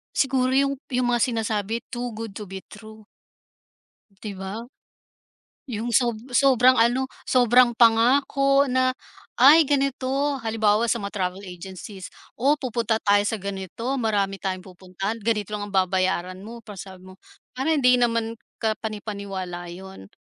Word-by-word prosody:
Siguro 260 -1 +1
yung 275 0 +1
yung 250 -1 0
mga 240 - +2
sinasabi, 225 -2 -1
too 245 -1 -4
good 225 -1 -6
to 210 - -7
be 190 0 -8
true. 215 0 -13 1.2
'Di 210 -2 -5
ba? 195 +4 -6 1.0
Yung 235 -1 -4
sob 235 -1 +2 0.2
sobrang 255 -1 +5
ano, 250 +3 +2 0.2
sobrang 245 -1 +4
pangako 275 +4 +4
na, 255 0 +2 0.4
"Ay, 300 +4 +7
ganito", 275 0 0
halimbawa 220 -1 +1
sa 235 - +2
mga 200 -3 -4
travel 190 0 -3
agencies, 190 +1 -9 0.3
"O, 280 +5 +3
pupunta 235 -5 -1
tayo 205 0 +4
sa 225 - -1
ganito, 200 +6 -4
marami 200 -4 0
tayong 185 -1 -3
pupuntahan, 190 +4 -6
ganito 210 -2 -1
lang 205 -1 -4
ang 200 - -8
babayaran 185 -1 0
mo", 230 +4 -10
parang 205 -4 -10
sabi 190 -1 -10
mo, - - -13 0.4
"Parang 280 +5 0
hindi 250 0 +5
naman 230 -1 0 0.2
kapani-paniwala 200 -5 -4
'yon", 180 - -10
225 Hz, 140 wpm, -24 LUFS, 195-250 Hz, 1.2 s, Ay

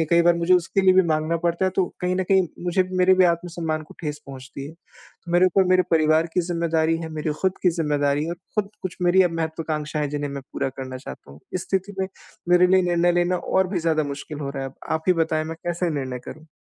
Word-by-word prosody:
हैं 160 - +1
कई 170 0 +5
बार 175 0 +5
मुझे 170 +2 +3
उसके 180 +2 +1
लिए 190 -1 +5
भी 190 - +6
माँगना 155 +2 +1
पड़ता 170 +2 +1
है, 185 - +2
तो 190 0 +1 0.2
कहीं 180 0 0
न 190 - +1
कहीं 190 -2 +4 0.2
मुझे 180 +1 +2
भी 185 0 -6
मेरे 185 +1 +5
भी 185 0 +5
आत्मसम्मान 170 -2 -1
को - - -13
ठेस 150 -3 -4
पहुँचती 135 0 -9
है। 150 - -10
तो 170 +1 -15
मेरे 180 +1 +5
ऊपर 190 +2 +3
मेरे 185 0 +5
परिवार 155 0 +3
की 180 - +2
ज़िम्मेदारी 165 -1 +1
है, 160 - -5
मेरी 155 0 -3
ख़ुद 190 -1 +3
की 180 - +4
ज़िम्मेदारी 145 -2 +1
है - - -4
और 170 - -4 0.2
ख़ुद 200 0 -10
कुछ 185 -1 -5
मेरी 180 +2 +5
अब 175 - +1
महत्वाकांक्षाएँ 155 -2 -2
है 145 - -3
जिन्हें 145 -1 -3
मैं 140 -1 -6
पूरा - - -1
करना 130 -1 -7
चाहता 125 - -10
हूँ। 70 +2 -14
इस 185 - -2
स्थिति 190 +1 -1
में 190 - 0 0.4
मेरे 180 0 +6
लिए 185 +1 +4
निर्णय 175 0 +2
लेना 175 +1 +1
और 190 +1 0
भी 185 -1 -1
ज़्यादा 160 -1 +1
मुश्किल 145 +2 -7
हो 140 -1 -3
रहा 135 -1 -5
है 135 - -3
अब। - - -24 0.2
आप 160 - 0
ही - - +7
बताएँ, 155 -1 -1
मैं 165 +1 -6
कैसे 175 0 -1
निर्णय 130 -4 -3
करूँ? 155 +1 -10
170 Hz, 255 wpm, -23 LUFS, 155-180 Hz, 0.4 s, ही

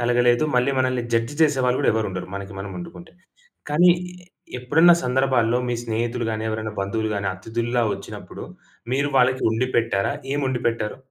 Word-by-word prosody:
కలగలేదు. 120 +2 +3
మళ్ళీ 125 +2 +3
మనల్ని 130 -1 +1
జడ్జ్ 115 +5 0
చేసేవాళ్ళు 130 -4 +2
కూడా - - +3
ఎవరు 110 -1 0
ఉండరు 90 -1 -5
మనకి 100 +1 -6
మనం 100 0 -6
వండుకుంటే. 170 -1 -10 0.6
కానీ 175 +5 +5 0.7
ఎప్పుడన్నా 160 +7 +5
సందర్భాల్లో 125 -2 +2
మీ 120 - 0
స్నేహితులు 115 +1 -2
గాని, 110 0 -3
ఎవరైనా 110 0 -4
బంధువులు 110 +3 -1
గాని, 100 -1 -2
అతిథుల్లా 115 +4 -2
వచ్చినప్పుడు, - - -9 0.5
మీరు 140 +2 +1
వాళ్ళకి 130 +1 +3
వండి 115 +3 0
పెట్టారా? 115 -3 +1 0.2
ఏం 145 - 0
వండి 130 -2 -1
పెట్టారు? 115 -1 -2
120 Hz, 155 wpm, -23 LUFS, 110-130 Hz, 0.7 s, కానీ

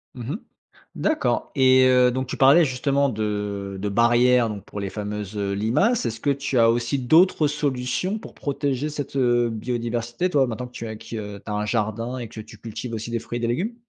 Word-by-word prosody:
Mmh 125 +2 -5
mh. - - -3 0.6
D'accord 210 - 0
et 130 -1 +5
heu, 125 -1 +5
donc 130 +1 -2
tu - - -4
parlais 140 +5 +6
justement 140 +1 +1
de 105 -3 -3
de 105 - -1
barrières, 120 +2 +4
donc 105 -2 -7
pour 105 - -7
les 100 - -3
fameuses, 105 0 -5
heu, 100 -1 -1
limaces. 120 - +1
Est-ce 115 -1 -3
que 145 - -1
tu 140 -1 -2
as 115 0 +6
aussi 120 +3 0
d'autres 155 +4 +4
solutions 145 - -1
pour - - -11
protéger 140 0 -2
cette, 145 -2 -6
heu, 120 -2 +3
biodiversité, 120 +6 -2
toi, 140 -5 +3
maintenant 120 +2 -5
que 125 - -21
tu 115 - -6
as 110 - -5
que - - -14
tu 115 - -6 0.3
as 105 - -4
un 105 0 -1
jardin 115 +3 -2
et 120 - -5
que 110 0 -9
tu 110 +1 -13
cultives 115 +1 -6
aussi 110 +1 -4
des 115 - -1
fruits 120 +1 -5
et - - -5
des 115 - 0
légumes? 185 - -1
120 Hz, 215 wpm, -23 LUFS, 110-135 Hz, 0.6 s, parlais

